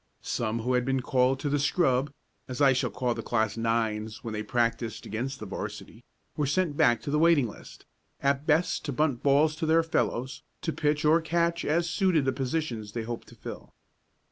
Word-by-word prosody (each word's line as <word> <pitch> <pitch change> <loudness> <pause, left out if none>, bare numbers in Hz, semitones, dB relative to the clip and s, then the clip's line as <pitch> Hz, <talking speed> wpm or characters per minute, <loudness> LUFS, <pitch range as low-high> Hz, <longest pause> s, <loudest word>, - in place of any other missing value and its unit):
Some 115 0 -2
who 125 +3 0
had 125 0 +2
been 135 0 0
called 130 +1 +2
to - - -2
the 145 +1 +1
"scrub," 135 -2 +2 0.4
as 130 +1 -6
I 140 -2 +6
shall 130 -1 0
call 120 +3 -1
the - - -5
class 110 -3 0
nines 110 0 -1
when 115 -2 -5
they 105 - -2
practiced 115 0 -1
against 130 +6 -4
the 110 - -6
'varsity, 95 - -7 0.3
were 150 - 0
sent 165 0 0
back 120 -5 +3
to 140 - -3
the 150 - +2
waiting 160 -6 +4
list 105 - -12 0.3
at 140 +1 0
best 160 +3 +2
to 145 - -2
bunt 140 -2 0
balls 145 +2 +3
to 160 - -2
their 165 +1 +4
fellows, 130 -5 -1 0.2
to 165 - -1
pitch 150 +1 0
or 160 +2 +5
catch 170 +1 0
as 170 +3 +1
suited 175 -5 +2
the 130 - +1
positions 125 -6 -3
they 115 - -3
hoped 120 +1 -6
to - - -15
fill. - - -9
135 Hz, 200 wpm, -28 LUFS, 115-155 Hz, 0.4 s, I